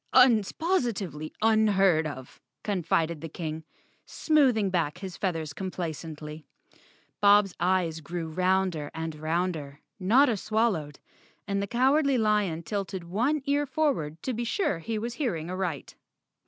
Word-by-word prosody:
Un's 235 Hz, -6 st, +6 dB
positively 215 Hz, -, -1 dB
unheard 195 Hz, -7 st, +4 dB
of," 130 Hz, -3 st, -9 dB, 0.2 s
con¬ 195 Hz, -4 st, -1 dB
fided 165 Hz, -1 st, 0 dB
the 165 Hz, -, -6 dB
King, 160 Hz, 0 st, -5 dB, 0.4 s
smoothing 255 Hz, -, +2 dB
back 170 Hz, -3 st, 0 dB
his 185 Hz, -1 st, -7 dB
feathers 165 Hz, -6 st, -2 dB
compla¬ 180 Hz, 0 st, -3 dB
cently. 155 Hz, 0 st, -8 dB, 0.8 s
Bob's 205 Hz, -2 st, +5 dB
eyes 175 Hz, -3 st, +1 dB
grew 170 Hz, +2 st, -5 dB
rounder 180 Hz, -2 st, 0 dB
and 160 Hz, 0 st, -3 dB
rounder, 155 Hz, -2 st, -2 dB, 0.2 s
Notta 230 Hz, +5 st, +4 dB
swallowed, 195 Hz, -10 st, -1 dB, 0.5 s
and 200 Hz, -1 st, 0 dB
the 200 Hz, -, -2 dB
Cowardly 270 Hz, +4 st, +3 dB
Lion 210 Hz, -7 st, +1 dB
tilted 195 Hz, +1 st, -4 dB
one 240 Hz, -, 0 dB
ear 285 Hz, 0 st, +1 dB
for¬ 310 Hz, 0 st, +2 dB
ward 155 Hz, -, -6 dB
to 260 Hz, -, -2 dB
be 240 Hz, +1 st, -2 dB
sure 235 Hz, -, 0 dB
he 220 Hz, +7 st, -3 dB
was 230 Hz, +2 st, -3 dB
hearing 180 Hz, -, -2 dB
aright. 185 Hz, -6 st, -3 dB
185 Hz, 140 wpm, -27 LUFS, 160-225 Hz, 0.8 s, Un's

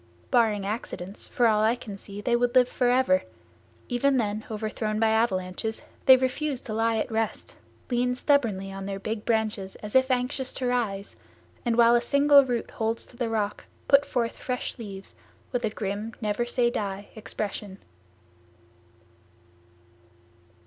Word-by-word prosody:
Barring 220 Hz, -6 st, +3 dB
accidents, 200 Hz, -2 st, -5 dB
for 245 Hz, -, +1 dB
all 215 Hz, -2 st, +4 dB
I 225 Hz, +2 st, +3 dB
can 225 Hz, -5 st, -8 dB
see 200 Hz, +1 st, -8 dB
they 240 Hz, +3 st, +2 dB
would 245 Hz, +1 st, +1 dB
live 250 Hz, -1 st, +6 dB
forever; 245 Hz, -7 st, +3 dB, 0.7 s
even 265 Hz, +3 st, +2 dB
then 215 Hz, -2 st, -1 dB
overthrown 215 Hz, 0 st, -2 dB
by 225 Hz, 0 st, +3 dB
avalanches, 220 Hz, -1 st, 0 dB, 0.2 s
they 260 Hz, -1 st, +10 dB
refuse 260 Hz, +2 st, -1 dB
to 215 Hz, -, -6 dB
lie 225 Hz, +1 st, +1 dB
at 220 Hz, -, -2 dB
rest, 225 Hz, 0 st, -2 dB, 0.4 s
lean 250 Hz, +1 st, +1 dB
stubbornly 230 Hz, -9 st, +1 dB
on 195 Hz, 0 st, -6 dB
their 195 Hz, -1 st, -3 dB
big 215 Hz, +2 st, -4 dB
branches 220 Hz, -4 st, -1 dB
as 210 Hz, 0 st, -8 dB
if 260 Hz, 0 st, +5 dB
anxious 255 Hz, +1 st, -1 dB
to 255 Hz, -, -3 dB
rise, 220 Hz, -6 st, -1 dB, 0.5 s
and 235 Hz, -1 st, +2 dB
while 235 Hz, 0 st, +6 dB
a 240 Hz, -, +4 dB
single 280 Hz, +3 st, +6 dB
root 245 Hz, -3 st, -2 dB
holds 225 Hz, +1 st, -2 dB
to -, -, -18 dB
the 240 Hz, -2 st, -2 dB
rock, 210 Hz, -2 st, -2 dB, 0.2 s
put 280 Hz, 0 st, +6 dB
forth 235 Hz, -4 st, -1 dB
fresh 250 Hz, -1 st, -4 dB
leaves 195 Hz, -3 st, -8 dB, 0.4 s
with 245 Hz, -1 st, -1 dB
a -, -, +1 dB
grim, 210 Hz, +2 st, -4 dB
never 215 Hz, +2 st, -1 dB
say 240 Hz, 0 st, +2 dB
die 200 Hz, -2 st, -4 dB
expression. 210 Hz, -3 st, -5 dB
225 Hz, 155 wpm, -26 LUFS, 210-245 Hz, 0.7 s, they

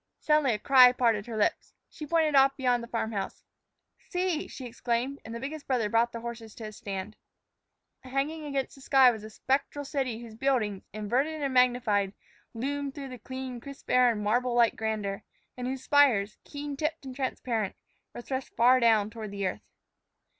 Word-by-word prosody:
Suddenly 300 Hz, -6 st, +3 dB
a -, -, -2 dB
cry 255 Hz, +2 st, +7 dB
parted 230 Hz, -4 st, +1 dB
her 225 Hz, -2 st, -5 dB
lips. 210 Hz, -, 0 dB
She 300 Hz, -, -9 dB
pointed 320 Hz, -1 st, +2 dB
off 275 Hz, 0 st, +5 dB
beyond 250 Hz, -3 st, +2 dB
the 235 Hz, -, -8 dB
farm 230 Hz, -2 st, -2 dB
house. 195 Hz, -3 st, -4 dB, 0.7 s
"See!" 360 Hz, -3 st, -1 dB
she 260 Hz, -, -8 dB
exclaimed, 245 Hz, +3 st, -2 dB
and 225 Hz, +1 st, -7 dB
the -, -, -4 dB
biggest 285 Hz, +4 st, -6 dB
brother 240 Hz, -5 st, +1 dB
brought 230 Hz, +2 st, +2 dB
the 230 Hz, -, -6 dB
horse 230 Hz, -2 st, -7 dB
to 230 Hz, -, -9 dB
a 215 Hz, -, -6 dB
stand. 200 Hz, 0 st, -6 dB, 0.8 s
Hanging 275 Hz, +5 st, -2 dB
against 275 Hz, -3 st, -2 dB
the 270 Hz, -, -15 dB
sky 265 Hz, -2 st, +6 dB
was 220 Hz, -3 st, -7 dB
a 215 Hz, -, -8 dB
spectral 275 Hz, +5 st, -1 dB
city 265 Hz, -5 st, -2 dB
whose 235 Hz, -2 st, -10 dB
buildings, 220 Hz, -5 st, 0 dB
inverted 250 Hz, +10 st, -1 dB
and 275 Hz, -2 st, -1 dB
magnified, 245 Hz, -6 st, +3 dB, 0.4 s
loomed 280 Hz, +3 st, -3 dB
through 275 Hz, -2 st, -6 dB
the 250 Hz, -1 st, -9 dB
clear, 260 Hz, +1 st, -6 dB
crisp 275 Hz, +2 st, -9 dB
air 250 Hz, -1 st, +5 dB
in 210 Hz, -2 st, -3 dB
marble 240 Hz, +3 st, +1 dB
like 235 Hz, -1 st, +4 dB
grandeur, 215 Hz, -3 st, -2 dB, 0.3 s
and 250 Hz, 0 st, -4 dB
whose 260 Hz, 0 st, -4 dB
spires, 255 Hz, -9 st, +3 dB
keen 290 Hz, -1 st, -6 dB
tipped 305 Hz, 0 st, -3 dB
and 260 Hz, -1 st, -7 dB
transparent, 240 Hz, -5 st, -2 dB, 0.4 s
were -, -, -6 dB
thrust 260 Hz, +1 st, -4 dB
far 250 Hz, +2 st, +5 dB
down 220 Hz, -3 st, +3 dB
toward 220 Hz, -2 st, -7 dB
the 200 Hz, -1 st, -3 dB
earth. 185 Hz, -, -2 dB
250 Hz, 185 wpm, -28 LUFS, 220-275 Hz, 0.8 s, cry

